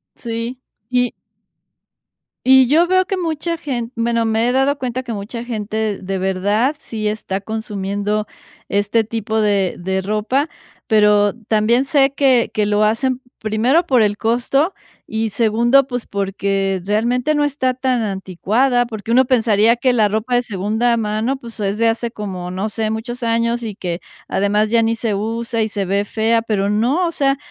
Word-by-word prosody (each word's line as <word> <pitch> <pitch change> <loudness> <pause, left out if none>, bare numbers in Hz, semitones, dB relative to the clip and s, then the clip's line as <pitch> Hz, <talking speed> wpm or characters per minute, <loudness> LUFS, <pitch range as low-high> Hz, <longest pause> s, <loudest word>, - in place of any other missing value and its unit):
Sí. 235 +2 -5 0.3
Y 245 -1 +1 1.3
Y 265 -1 +6
yo 325 +6 +4
veo 370 0 +3
que 385 - -2
mucha 335 -1 -2
gen 250 -5 -4
bueno, 230 0 0
me 225 +2 +1
he - - +2
dado 270 +2 +2
cuenta 255 -1 -3
que 240 -2 -5
mucha 220 +4 -6
gente, 215 -2 -2
de 190 +1 -3
verdad, 200 +8 +1
sí 215 -7 -4
está 210 -2 -3
consumiendo 205 0 -3 0.4
este 205 +3 +1
tipo 220 0 -2
de 200 -3 +1
de 190 +2 -1
ropa, 215 - 0 0.4
pero 210 -2 +4 0.2
también 230 +4 +2
sé 275 -2 +3
que 265 -4 +3
que 210 - +1
lo 210 +1 +2
hacen, 255 +4 +1 0.2
primero, 235 +10 +2
por 255 -6 +3
el 205 -1 +2
costo 260 - +1 0.3
y, 220 0 -1
segundo, 235 +5 +3
pues, 245 -2 -4
porque 195 -1 -1
realmente 240 +7 +1
no 295 - +2
está 260 -3 0
tan 255 -1 0
anticuada, 215 +6 0
porque 220 0 -6
uno 255 +2 +6
pensaría 225 -2 +3
que 255 +1 +2
la 220 -3 +3
ropa 220 +4 -1
de 245 - +3
segunda 220 +2 0
mano, 220 +5 -1
pues, 235 -3 -11
es 200 +1 -1
de 230 +1 +2
hace 230 +1 -2
como, 185 -5 -6
no 190 +3 -2
sé, 220 0 -2
muchos 240 +3 -4
años 230 +1 0
y 215 -3 -5
que, 180 -3 -4 0.3
además, 210 +2 +1
ya 230 0 +3
ni 225 0 +1
se 225 -2 -2
usa 230 +2 -2
y 220 - 0
se 200 -2 -2
ve 200 +2 +1
fea, 225 +2 +1
pero 205 -3 -1
no, 245 - +1
o - - -2
sea, 275 -3 +1
225 Hz, 170 wpm, -19 LUFS, 210-250 Hz, 1.3 s, Y